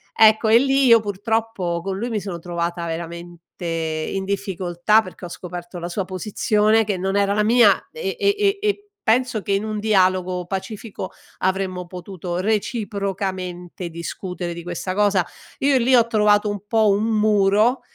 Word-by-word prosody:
ecco, 220 0 +5
e 230 +2 +7
lì 270 0 +3
io 230 -2 +7
purtroppo 205 -4 -2
con 195 -1 -3
lui 235 +4 -3
mi 220 - -1
sono 190 -4 -5
trovata 170 0 -3
veramente 170 +1 -6 0.2
in 165 +3 -2
difficoltà, 190 +1 +1
perché 185 -2 -10
ho 175 - -7
scoperto 175 0 -8
la 170 - -4
sua 195 +2 -2
posizione 210 +3 +1
che 205 -3 -1
non 190 +2 -2
era 200 0 +2
la 210 0 +2
mia 225 -2 +4
e 470 -3 -4
e 400 -1 +3
e 400 -1 +2
e 410 0 -1 0.2
penso 240 -1 +2
che 200 - -1
in 200 +2 +1
un 215 -1 -3
dialogo 185 -3 +2
pacifico 195 +1 -6 0.3
avremmo 185 -1 -1
potuto 180 -1 -6
reciprocamente 195 -4 -3
discutere 175 +2 -5
di 170 0 -8
questa 175 +1 -4
cosa, 200 -3 +2 0.3
io 275 -1 +3
lì 255 +1 +4
ho 235 -1 +5
trovato 210 -1 +3
un 205 -2 -4
po' 220 -2 +3
un 205 +2 +2
muro 215 +2 +3
195 Hz, 165 wpm, -22 LUFS, 180-220 Hz, 0.3 s, e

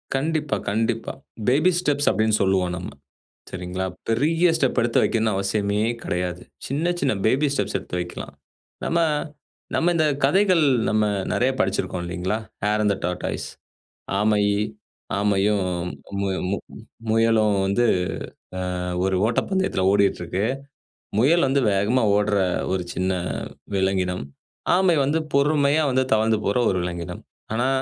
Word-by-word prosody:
கண்டிப்பா, 150 +1 0
கண்டிப்பா 115 +2 -1 0.4
baby 155 +8 +4
steps 145 -4 +1
அப்டின்னு 110 0 +2
சொல்லுவோம் 95 -2 +2
நம்ம 90 - -6 0.6
சரிங்களா? 90 +1 -4 0.2
பெரிய 160 +9 +3
ஸ்டெப் 135 -5 +1
எடுத்து 115 0 +2
வைக்கணும்னு 110 -1 +1
அவசியமே 100 +1 0 0.2
கிடையாது. 90 0 -2 0.2
சின்ன 160 +6 0
சின்ன 130 - +1
பேபி 135 +6 +3
ஸ்டெப்ஸ் 100 -6 -1
எடுத்து 90 - -6
வைக்கலாம். 90 0 -6 0.5
நம்ம 170 - +1 0.8
நம்ம 175 +2 +2
இந்த 160 - +3 0.2
கதைகள், 185 +4 +4 0.3
நம்ம 110 0 +2 0.3
நிறைய 130 +2 +2
படிச்சிருக்கோம் 95 -2 -1
இல்லிங்களா? 90 +4 -2 0.3
ஹேர் 105 +1 +2
இன் 105 - +3
தே - - -5
டார்டாஸ் 90 0 -3 0.7
ஆமை 105 0 +3 0.8
ஆமையும் 100 -1 +2 0.6
மு 100 - 0 0.8
முயலும் 110 -2 +3
வந்து 100 +5 +2 0.9
ஆ - - -3 0.2
ஒரு 95 -1 +1
ஓட்டப்பந்தயத்தில 190 - 0
ஓடிட்டு 100 -2 +2
இருக்கு. 90 +4 -2 0.7
முயல் 145 +6 +4
வந்து 140 +1 +2
வேகமா 105 +6 +2
ஓடுற 105 0 +2 0.3
ஒரு 95 - 0
சின்ன 95 +1 0 0.6
விலங்கினம். 95 -4 0 0.5
ஆமை 180 -3 +3
வந்து 145 +4 +1 0.2
பொறுமையா 145 +1 +3
வந்து 130 0 +2
தவழ்ந்து 110 0 +2
போற 100 - +2
ஒரு 95 - 0
விலங்கினம். 85 0 -5 0.3
ஆனா, 120 +3 +1
110 Hz, 125 wpm, -23 LUFS, 95-140 Hz, 0.9 s, பேபி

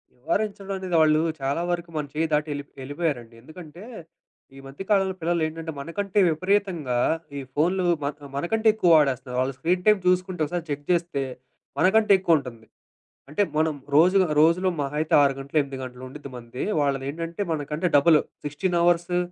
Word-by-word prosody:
నివారించడం 200 - -2
అనేది 185 -2 -3
వాళ్ళు 155 0 +4 0.2
చాలా 140 +5 -1
వరకు 170 -1 -3
మన 150 - -2
చెయ్యి 160 +2 0
దాటి 150 +1 +1
యెళ్ళిప్ 145 0 -6
యెళ్ళిపోయారండి. 135 -5 -3
ఎందుకంటే, 160 - -12 0.7
ఈ - - -11
మధ్య 140 +8 -8
కాలంలో 195 -2 +2
పిల్లలేంటంటే, 165 -1 -2
మనకంటే 195 +7 -2
విపరీతంగా 175 -7 0 0.4
ఈ - - -4
ఫోనులు 180 +5 +1 0.2
మన్ 140 0 -2 0.2
మనకంటే 220 +9 0
ఎక్కువ 185 -5 +2
వాడేస్తున్నారు. 135 -4 +1
వాళ్ళు 130 +1 -2
స్క్రీన్ 180 +2 0
టైమ్ 210 -2 +6
చూసుకుంటే, 185 -1 +1
ఒకసారి 170 +2 -4
చెక్ 145 0 -4
జేస్తే, 170 -5 0 0.6
మనకంటే 215 +3 +4
ఎక్కువుంటుంది. 135 -11 0 0.6
అంటే 155 +8 -1 0.2
మనం 155 -1 +1 0.2
రోజుగా 185 +3 +5
రోజులో 170 +4 +3
మహాయితే 150 +3 -2
6 140 -1 +3
గంటలు 140 +3 -4
ఎనిమిది 140 -1 -6
గంటలు 125 0 -9
ఉండిద్ది 140 +2 -10
మనది. 120 +1 -7 0.2
వాళ్ళదేంటంటే, 145 +6 -2
మనకంటే 150 +3 -2
డబుల్ 155 +2 +5 0.3
16 175 +5 -1
అవర్సు 175 +1 +2
160 Hz, 150 wpm, -24 LUFS, 140-180 Hz, 0.7 s, టైమ్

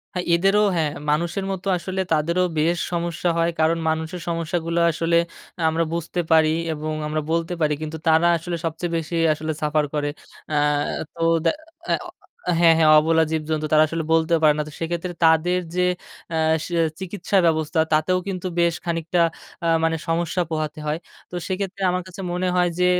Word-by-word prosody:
হ্যাঁ, 180 - -2
এদেরও 195 +4 +3
হ্যাঁ, 155 -3 +1 0.2
মানুষের 170 +6 0
মতো 190 +1 -5
আসলে 190 +2 -3
তাদেরও 170 +4 +1 0.2
বেশ 170 +3 +2
সমস্যা 170 0 -1
হয়, 165 0 +2
কারণ 160 +1 +3
মানুষের 160 +2 -3
সমস্যাগুলো 165 0 -1
আসলে 170 +1 +1 0.5
আমরা 165 +1 +1
বুঝতে 170 +1 -2
পারি 160 -1 +5 0.2
এবং 155 +1 -4
আমরা 155 0 -1
বলতে 165 +1 0
পারি, 150 -1 +2
কিন্তু 155 +1 -4
তারা 160 +2 +5
আসলে 170 +2 -4
সবচেয়ে 165 +1 -3
বেশি 165 +1 -4 0.2
আসলে 155 +1 -4
সাফার 150 0 +1
করে। 145 -1 0 0.4
অ্যা 150 -1 +1 0.5
তো 165 - -9 1.4
হ্যাঁ, 165 -1 +6
হ্যাঁ, 155 -1 +5
অবলা 160 +1 +3
জীবজন্তু 155 -1 -1
তারা 155 0 +6
আসলে 165 +1 -3
বলতে 165 +1 +2
পারে 150 - +6
না, - - +1
তো 150 - -10
সেক্ষেত্রে 170 +2 -3
তাদের 165 +3 +4 0.2
যে, 180 - +2 0.5
আ 160 - 0 0.6
চিকিৎসা 190 +1 -2
ব্যবস্থা 160 0 +1
তাতেও 170 +4 +2
কিন্তু 185 -1 -3
বেশ 170 -1 +3
খানিকটা 165 +1 -1 0.5
আ - - +2 0.2
মানে 165 0 +2
সমস্যা 170 +2 0
পোহাতে 155 -1 -3
হয়, 150 - 0 0.3
তো - - -6
সেক্ষেত্রে 195 0 -3
আমার 180 0 -1
কাছে 185 +1 -9
মনে 180 +1 -1
হয় 180 -1 +3
যে, 180 - +4
165 Hz, 165 wpm, -22 LUFS, 155-175 Hz, 1.4 s, হ্যাঁ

